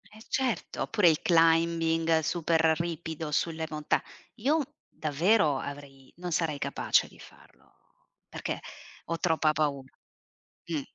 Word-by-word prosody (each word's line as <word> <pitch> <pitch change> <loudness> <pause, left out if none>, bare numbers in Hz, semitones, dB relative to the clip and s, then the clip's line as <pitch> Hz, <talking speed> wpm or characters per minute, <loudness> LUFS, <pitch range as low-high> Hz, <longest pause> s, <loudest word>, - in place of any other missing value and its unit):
Eh 215 +1 -15
certo, 260 -3 -1
oppure 205 -6 +4
il 155 - +1
climbing 165 -1 +3
super 165 +1 0 0.2
ripido 160 -2 -4
sulle 160 +1 -1
monta 150 -1 0 0.3
Io 275 +8 +1 0.3
davvero 155 +1 +2
avrei 140 -2 -9
non 180 0 -5
sarei 160 -2 0
capace - - +1
di - - -19
farlo, - - -18 0.6
perché - - -4 0.5
ho 165 - -2
troppa 160 -3 +2
pau 145 -3 0 0.9
Mh. 160 -3 -1
165 Hz, 120 wpm, -29 LUFS, 155-170 Hz, 0.9 s, oppure